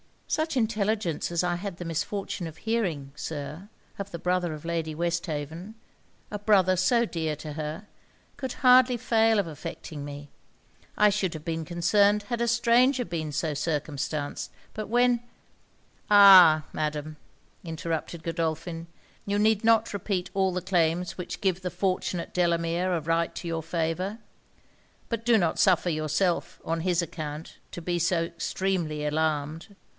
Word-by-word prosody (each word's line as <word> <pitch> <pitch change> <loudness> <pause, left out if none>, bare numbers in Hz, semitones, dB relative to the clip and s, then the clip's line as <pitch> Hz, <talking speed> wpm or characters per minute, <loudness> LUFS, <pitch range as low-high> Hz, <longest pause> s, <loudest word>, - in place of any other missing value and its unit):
'Such 315 -1 -1
intelligence 215 - 0
as 170 0 0
I 175 -1 0
had 195 0 -5
the 175 - -6
misfortune 175 +2 -3
of 160 -1 -10
hearing, 180 -12 -2
Sir, 150 +5 -6 0.3
of 200 0 -4
the 170 - -6
brother 180 -1 0
of 150 - -9
Lady 165 -2 -2
Westhaven 170 +3 -3 0.6
a 210 - -4
brother 195 -3 +4
so 235 +6 +3
dear 160 -6 -2
to 150 0 -7
her 155 +5 -5 0.5
could 265 -3 -4
hardly 250 -1 +6
fail 225 -2 +3
of 200 - +2
affecting 155 -1 -7
me. 145 0 -9 0.7
I 210 - +6
should 195 -3 -1
have 155 - -7
been 165 -1 -3
concerned 200 +5 +3
had 240 -1 -1
a 235 - +1
stranger 245 +2 +3
been 160 -3 -4
so 155 +1 -1
circumstanced; 145 -1 -3 0.2
but 215 -1 -5
when 245 +1 +3 0.4
' - - -36
'Ah! 190 -6 +9
Madam,' 150 0 -3 0.5
interrupted 165 0 -4
Godolphin, 165 0 -3 0.4
'you 200 0 0
need 215 0 +2
not 225 0 +4
repeat 190 -2 -2
all 190 -2 +1
the 180 - -2
claims 175 -1 0
which 180 -1 -6
give 190 -2 0
the 180 - -2
fortunate 180 -1 -2
Delamere 170 +1 +1
a 165 - -1
right 165 +2 0
to 175 - -6
your 165 -1 -2
favour. 165 +5 -2 0.9
But 230 -1 -3
do 235 -1 +5
not 170 -5 0
suffer 180 -1 +4
yourself, 170 +3 -1
on 165 0 -1
his 175 0 +1
account, 155 -2 -6
to 175 - -7
be 175 0 -1
so 170 0 +2
extremely 170 -2 -2
alarmed. 155 +4 -2
175 Hz, 150 wpm, -27 LUFS, 160-205 Hz, 0.9 s, Ah